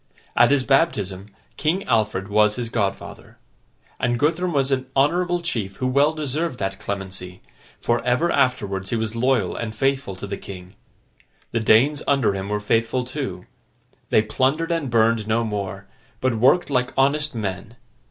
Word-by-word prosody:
At - - +6
his 140 -2 +3
baptism, 105 - +1 0.3
King 175 +6 0
Alfred 105 -5 0
was 105 0 +3
his 120 -2 -4
godfather. 100 -4 -3 0.6
And 120 -1 +1
Guthrum 165 +7 +1
was 140 -3 +1
an 130 -1 0
honourable 175 +5 +2
chief 105 - -2
who 130 - -3
well 140 +4 +3
deserved 155 -1 -2
that 95 -1 -3
clemency; 95 -3 -6 0.4
for, 120 0 0
ever 125 +8 +1
afterwards 100 -8 0
he - - -1
was 110 0 -2
loyal 120 -5 +1
and 110 -2 -4
faithful 135 -5 0
to 95 - -7
the 100 0 -5
king. 90 -1 -10 0.8
The 115 - 0
Danes 125 +7 +4
under 135 -7 +3
him 95 0 -4
were 105 0 0
faithful 115 +4 0
too. 125 -9 -5 0.6
They 110 - +4
plundered 135 +9 0
and 165 -5 -1
burned 115 -1 +2
no 115 +1 +1
more, 100 -3 -4 0.3
but 130 -1 +1
worked 145 +7 +4
like 125 0 0
honest 145 +1 +2
men. 105 +1 -4
120 Hz, 160 wpm, -22 LUFS, 105-140 Hz, 0.8 s, At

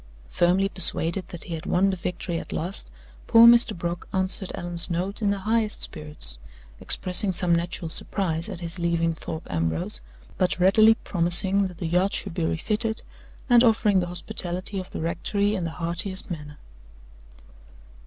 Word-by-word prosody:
Firmly 180 - +2
persuaded 185 -1 +2
that 175 - -10
he 175 - -7
had 165 +3 -6
won 195 +2 +2
the - - -2
victory 175 -1 -4
at - - -9
last, 175 - -2 0.4
poor 230 0 +7
Mr. 235 -3 +6
Brock 170 +1 -5
answered 190 0 -1
Allan's 175 0 -3
note 185 +5 -2
in 205 - +1
the 200 - 0
highest 215 +2 -1
spirits, 150 - -3 0.4
expressing 190 +2 +2
some 180 -1 +2
natural 170 0 -2
surprise 165 +1 -3
at 185 -4 -8
his 170 +1 -6
leaving 170 -1 0
Thorpe 160 0 -7
Ambrose, 80 -7 -2 0.4
but 185 - +1
readily 215 +5 +5
promising 190 +1 +4
that 180 -2 -12
the 175 - -5
yacht 180 +4 +1
should 195 - -4
be 170 - -3
refitted, 215 +7 -1 0.4
and 240 -2 +5
offering 215 -4 +3
the 175 - -2
hospitality 180 +2 -2
of 185 - -8
the - - -6
rectory 200 +5 -1
in 185 -5 -2
the - - -3
heartiest 170 +4 -2
manner. 150 -3 -8
180 Hz, 165 wpm, -24 LUFS, 170-195 Hz, 0.4 s, poor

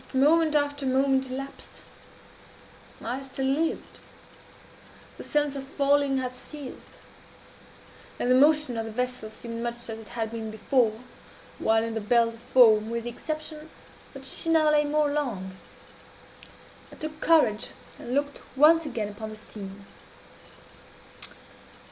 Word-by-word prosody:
But 265 - -3
moment 310 +3 +4
after 285 -1 0
moment 265 0 +2
elapsed. 275 +2 -8 1.2
I 250 +4 -3
still 270 0 -4
lived. 300 +5 -1 1.2
The - - -6
sense 295 -1 0
of 275 - -4
falling 280 0 +2
had 255 -1 -3
ceased; 285 +1 -10 1.2
and 245 - 0
the - - +7
motion 290 -2 +4
of 225 - -2
the 225 - -6
vessel 250 -1 -3
seemed 230 +1 -7
much 235 0 -2 0.2
as 220 - -6
it 220 - -12
had 225 -2 -3
been 225 -1 -5
before, 220 0 +1 0.6
while 220 0 +3
in 230 0 -3
the 225 - -2
belt 230 +2 +3
of 230 - -14
foam, 225 -3 +5
with 235 0 -3
the 240 - -4
exception 310 +3 -6 0.5
that - - -9
she 330 - -2
now 315 -2 +4
lay 295 0 +4
more 295 0 +1
along. 215 -11 -3 1.4
I - - -11
took 310 0 -7
courage 245 -10 +3 0.3
and 245 - -4
looked 285 0 -1
once 315 +3 +6
again 225 -6 -3
upon 215 +1 -7
the 215 - -8
scene. 200 -2 -10
260 Hz, 140 wpm, -27 LUFS, 225-290 Hz, 1.4 s, the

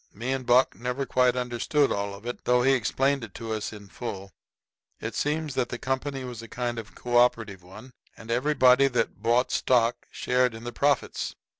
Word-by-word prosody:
Me 120 +5 -3
and 130 -2 -3
Buck 125 +2 +5
never 125 +3 -3
quite 125 0 +2
understood 125 +4 0
all 100 0 -2
of 100 +3 -14
it, 120 - -6
though 125 0 +3
he 135 - +4
explained 135 +2 +1
it 110 - -9
to 115 -1 -4
us 110 -1 -3
in 105 -2 -11
full. 100 -3 -7 0.7
It - - -5
seems 150 0 -1
the 120 -2 -2
company 135 +1 -3
was 120 -3 -7
a 115 - -10
kind 120 0 -3
of 105 -2 -10
cooperative 120 -5 +1
one, 105 +8 -13 0.3
and 110 +1 -8
everybody 130 +1 +4
that 115 -6 -1
bought 120 +3 +2
stock 120 -2 +1
shared 125 -2 +1
in 115 - -10
the 120 0 -6
profits. 145 -1 0
125 Hz, 185 wpm, -26 LUFS, 115-130 Hz, 0.7 s, Buck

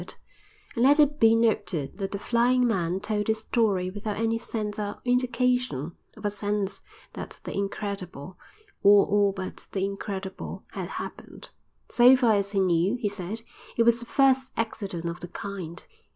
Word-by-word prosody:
And - - -8 0.7
let 285 +3 +6
it 295 0 +4
be 225 0 +6
noted 210 -8 0
that 195 -1 -2
the 200 - -4
flying 245 +4 +2
man 185 -4 0
told 210 -1 -1
his 220 0 +2
story 205 -5 0
without 205 +1 -4
any 225 +1 0
sense 215 -2 -4
or 205 -1 -4
indication 250 - +1 0.3
of - - -9
a 205 - +1
sense 205 -1 -2 0.3
that - - -7
the - - -5
incredible, 195 -4 -4 0.5
or 200 0 +7
all 205 0 +3
but 190 -1 -7
the 195 -1 0
incredible, 195 -1 -5
had - - -5
happened. - - -8 0.4
So 250 +2 +7
far 245 -4 +3
as 200 -1 0
he 195 - +2
knew, 185 +3 +2
he 235 -4 -1
said, 205 +3 -5 0.3
it 230 - +5
was 235 0 +4
the 235 - -8
first 265 -1 +3
accident 200 -6 -3
of 170 +1 -3
the 175 - -7
kind. 180 -2 -7
205 Hz, 165 wpm, -26 LUFS, 195-230 Hz, 0.7 s, or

